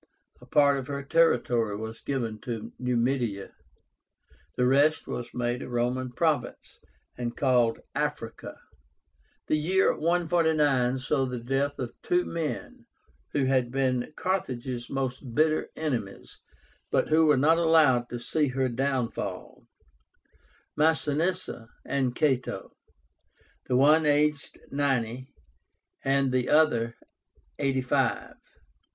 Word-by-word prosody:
A - - -15
part 140 -1 +4
of 130 - -7
her 140 0 -4
territory 125 -9 +2
was 110 +1 -7
given 115 -6 -3
to 115 0 -6
Numidia. 120 -4 -1 1.1
The 125 - +2
rest 145 +5 +3
was 120 -1 -5
made 120 0 -2
a - - -7
Roman 125 +1 -1
province, 155 +3 -2 0.4
and 120 -1 -4
called 125 -4 +2
AFRICA. - - -4 0.9
The 155 - +1
year 190 +5 +2
149 160 -6 +2
saw 135 0 0
the 125 -1 -4
death 135 +4 -1
of 125 -3 -5
two 355 0 +1
men 240 - -5 0.5
who 140 -2 +1
had 130 -2 +1
been 130 -1 -1
Carthage's 130 -9 -3
most 130 -2 -4
bitter 155 0 +2
enemies, 125 -11 -4 0.5
but - - +1
who 160 +1 +4
were 150 -2 +5
not 160 +5 +4
allowed 155 -7 +4
to 120 - -5
see 150 +5 0
her 130 0 0
downfall, 130 -1 -3 1.1
MASINISSA 160 -2 0 0.2
and 130 -3 -1
CATO, 135 -5 -1 1.0
the 125 - 0
one 150 +4 +5
aged 150 0 +1
ninety, 130 -3 -1 0.7
the 135 -2 +1
other 120 -7 +3 0.6
eighty 135 -2 +1
five. 125 - 0
135 Hz, 115 wpm, -27 LUFS, 125-150 Hz, 1.1 s, were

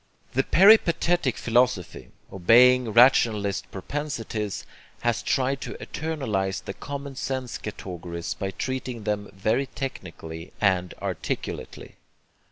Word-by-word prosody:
The 135 - +3
peripatetic 170 - +4
philosophy, 115 -4 0 0.2
obeying 120 +6 +5
rationalist 110 -4 +4
propensities, 110 -3 -4 0.4
has 120 -1 0
tried 135 0 0
to - - -5
eternalize 110 -12 -3
the - - -5
common 140 -1 -7
sense 130 -1 -3
categories 85 -4 -6
by 95 - -4
treating 125 +2 -4
them 105 -1 -2
very 110 +7 0
technically 85 - -7
and 90 -3 +1
articulately. - - -5
115 Hz, 100 wpm, -25 LUFS, 95-135 Hz, 0.4 s, obeying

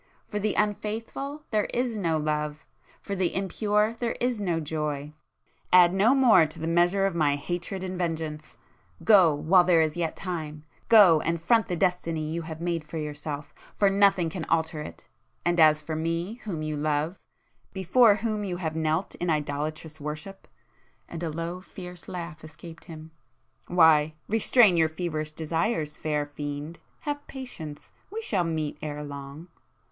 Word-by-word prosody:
For 210 - -3
the 210 0 0
unfaithful 225 +8 -2
there 215 -2 +2
is 245 -1 0
no 170 -6 0
love,—for 150 +5 -5
the 185 -2 0
impure 210 +3 0
there 235 -1 -1
is 245 -3 0
no 175 -4 0
joy. 150 -1 -3 0.6
Add 180 -1 +7
no 210 +7 +4
more 220 - +6
to 155 - -9
the 160 - -4
measure 175 +4 +3
of 195 - 0
my 150 -4 +2
hatred 175 +5 -4
and 185 -1 -4
vengeance!—Go 160 +2 +1
while 165 +5 +4
there 175 -2 +4
is 155 -1 +1
yet 170 -2 -2
time,—go 165 +2 +3
and 170 0 -1
front 225 +7 +3
the 180 - -2
destiny 170 -3 0
you 170 +1 -2
have 160 -1 -7
made 170 -1 -2
for 150 +2 -7
yourself—for 150 +5 -3
nothing 195 -4 +4
can 170 -1 -4
alter 160 -1 0
it! - - -10 0.4
And 175 0 +2
as 155 -1 +5
for 155 +1 -4
me, 165 +8 -3
whom 170 -7 -3
you 155 -1 -3
love,—before 180 - 0
whom 215 0 -2
you 180 -3 -3
have 160 -3 -3
knelt 160 +3 -1
in 175 - -3
idolatrous 155 +1 -3
worship—" 150 +6 -6 0.6
and 170 - -7
a 170 - -2
low 170 +3 -4
fierce 180 -2 -10
laugh 170 -3 -7
escaped 160 +1 -11
him—"why,—restrain 160 +5 +2
your 160 -1 +4
feverish 155 -2 -3
desires, 160 +1 -2
fair 150 -1 -1
fiend!—have 150 - -6
patience!—we 255 - -8
shall 195 - +1
meet 155 -3 -3
ere 150 -1 -5
long!" 140 +3 -8
165 Hz, 145 wpm, -27 LUFS, 155-195 Hz, 0.6 s, Add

